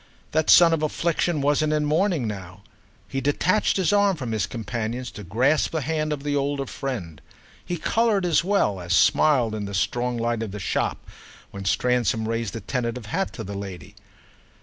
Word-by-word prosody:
That 155 0 +1
son 170 -1 +8
of 160 - 0
affliction 165 0 0
wasn't 150 +2 +2
in 150 -1 +1
mourning 155 - +1
now; 100 -2 -7 0.4
he 135 - -3
detached 170 +11 +1
his 185 -1 +2
arm 200 -2 +4
from 125 -5 -4
his 105 -2 0
companion's 115 +2 -4
to 105 - -9
grasp 125 - +2
the 160 - 0
hand 155 +1 -1
of 145 -2 -3
the 145 -1 -1
older 140 0 -1
friend. 105 - -5 0.4
He 175 - -3
coloured 220 +1 +1
as 170 -2 +3
well 185 - +1
as 90 +1 -2
smiled 125 +2 +4
in 105 -1 -3
the 100 0 -5
strong 120 +6 0
light 115 0 -1
of 115 - -3
the 105 +2 -7
shop 90 - -2 0.5
when 100 0 -8
Stransom 120 +1 +1
raised 115 -1 -2
a 115 - -5
tentative 120 +1 -3
hat 185 - -2
to 110 - -6
the 100 0 -6
lady. 100 -2 -7
125 Hz, 185 wpm, -24 LUFS, 110-155 Hz, 0.5 s, son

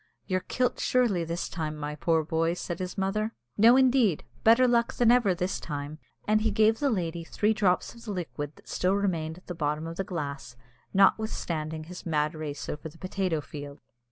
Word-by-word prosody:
"You're 185 0 0
kilt 250 +6 -1
surely 235 -9 +2
this 170 +2 -3
time, 155 -3 -4
my 150 0 -4
poor 160 +1 +1
boy," 165 +2 0
said 175 -1 -5
his 185 -1 -5
mother. 215 +3 -1 0.2
"No, 230 +4 +7
indeed, 255 - +3 0.2
better 230 +3 +6
luck 235 -1 +2
than 240 -1 +5
ever 235 -7 +4
this 180 +2 -2
time!" 145 0 -5 0.3
and 215 0 +3
he 220 - +2
gave 220 +1 +3
the 285 - +2
lady 170 -6 -2
three 210 +6 +1
drops 195 -4 +1
of 235 0 -14
the 215 - -4
liquid 155 -5 -5
that - - -20
still 185 +2 +1
remained 170 -5 -1
at 185 - -17
the 180 - -5
bottom 150 -1 -2
of 165 +1 -6
the 195 - 0
glass, 140 -8 -5 0.4
notwithstanding 170 -6 +1
his 180 +3 -9
mad 155 -1 0
race 150 -3 -5
over 150 +2 -5
the 160 - -17
potato 185 -3 -1
field. 145 0 -9
180 Hz, 195 wpm, -28 LUFS, 155-215 Hz, 0.4 s, No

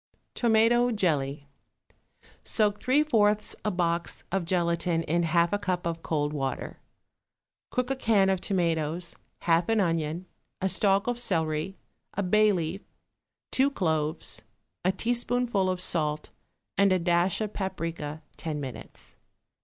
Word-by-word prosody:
=Tomato 235 +1 +4
Jelly.= 150 - 0 1.0
Soak 210 -2 +1
three 270 +4 +3
fourths 210 -7 +2
a 215 - +1
box 170 -2 -1
of 190 -2 0
gelatine 170 -1 +1
in 170 +2 +1
half 170 +2 +2
a 205 - +1
cup 180 -3 -2
of 165 -1 -2
cold 150 -2 -1
water. 135 -2 -3 0.9
Cook 250 +1 -1
a - - +1
can 220 -6 +3
of 190 -2 -1
tomatoes, 170 -2 -1 0.3
half 170 +2 +2
an 225 -1 +3
onion, 165 -1 0 0.3
a 190 - 0
stalk 200 +1 +2
of 245 -1 -1
celery, 165 -3 0 0.4
a 200 - 0
bay 215 +3 +4
leaf, 175 +1 -2 0.7
two 270 +2 +4
cloves, 160 - -1 0.4
a 185 - +3
teaspoonful 240 -2 0
of 185 -1 -1
salt 155 -4 -1 0.5
and 200 -1 +5
a 185 - +4
dash 175 +1 +2
of 215 -1 -3
paprica 165 -5 -4
ten 155 -2 -3
minutes. 135 -3 -8
180 Hz, 135 wpm, -28 LUFS, 165-210 Hz, 1.0 s, and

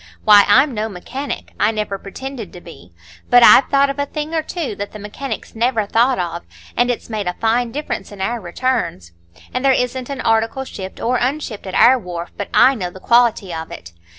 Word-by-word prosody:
Why, 205 -1 +8
I'm 260 +7 +4
no 215 0 -2
mechanic,—I 235 +3 -3
never 210 -3 -3
pretended 235 +1 -8
to 180 - -9
be—but 90 - -1
I've 260 - +7
thought 275 0 +3
of 275 - -8
a 285 - -1
thing 305 +2 -5
or 320 - +1
two 315 -5 -4
that 205 0 -6
the - - -7
mechanics 210 +7 -6
never 230 -1 0
thought 235 +5 +2
of, 170 -1 -3 0.3
and 245 +1 +2
it's 245 - -3
made 215 -4 -4
a 180 - -1
fine 230 +1 0
difference 280 -8 -5
in 205 - -11
our 230 +5 -2
returns. 175 - -2 0.4
And 255 - -2
there 270 -1 +5
isn't 250 0 -2
an 275 -2 -4
article 225 +4 +1
shipped 190 -6 -8
or 250 +2 0
unshipped 250 -6 -3
at 190 - -5
our 255 +2 +6
wharf 175 -4 -7
but 200 - -5
I 265 - +6
know 185 -8 -4
the 185 - -13
quality 235 -4 +2
of 160 0 -6
it. 85 - -10
225 Hz, 205 wpm, -19 LUFS, 195-260 Hz, 0.4 s, Why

